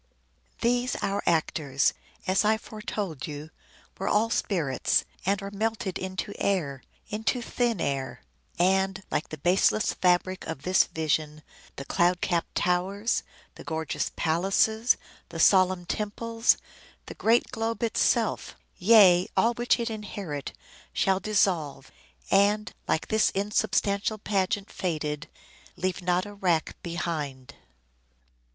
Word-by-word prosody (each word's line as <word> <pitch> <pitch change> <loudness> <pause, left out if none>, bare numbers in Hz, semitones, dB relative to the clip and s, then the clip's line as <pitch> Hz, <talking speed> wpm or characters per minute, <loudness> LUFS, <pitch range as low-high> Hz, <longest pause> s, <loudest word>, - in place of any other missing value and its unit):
These 245 +1 +1
our 200 +1 0
actors, 155 -4 +1 0.3
As 190 +3 +2
I 215 +1 +3
foretold 205 -9 -5
you, 150 +1 -7 0.5
were 195 - -2
all 220 +2 +2
spirits, 160 -13 +1 0.2
and 200 0 +2
Are 200 - -5
melted 215 -2 -2
into 190 +2 -4
air, 150 -9 0 0.3
into 220 +4 -1
thin 240 -3 -1
air: 135 -3 -3 0.3
And, 190 +2 +2
like - - -1
the 155 - -6
baseless 185 +6 +2
fabric 185 +1 +1
of 160 -4 -5
this 185 +1 +4
vision, 155 -1 -2 0.3
The 140 - -7
cloud 175 +4 +2
capp'd 175 -2 -1
towers, 190 +5 0 0.3
the - - -12
gorgeous 160 -1 -2
palaces, 195 +8 +2 0.3
The - - -7
solemn 185 -2 +4
temples, 225 +4 +1 0.5
the - - -8
great 230 +2 +2
globe 225 +1 -2
itself, 230 0 +1 0.2
Yea, 185 -3 +6
all 235 +1 +4
which 240 +1 +1
it 235 -1 -2
inherit, 195 -9 -5 0.4
shall 190 -1 +2
dissolve, 165 -10 0 0.4
And, 205 +2 +3
like 160 - 0
this 220 0 +3
insubstantial 205 +1 0
pageant 200 -1 -1
faded, 155 -4 -3 0.5
Leave 185 0 -2
not 180 +1 +1
a 205 - -9
rack 180 -5 0
behind." 155 -6 -4
190 Hz, 120 wpm, -27 LUFS, 165-210 Hz, 0.5 s, Yea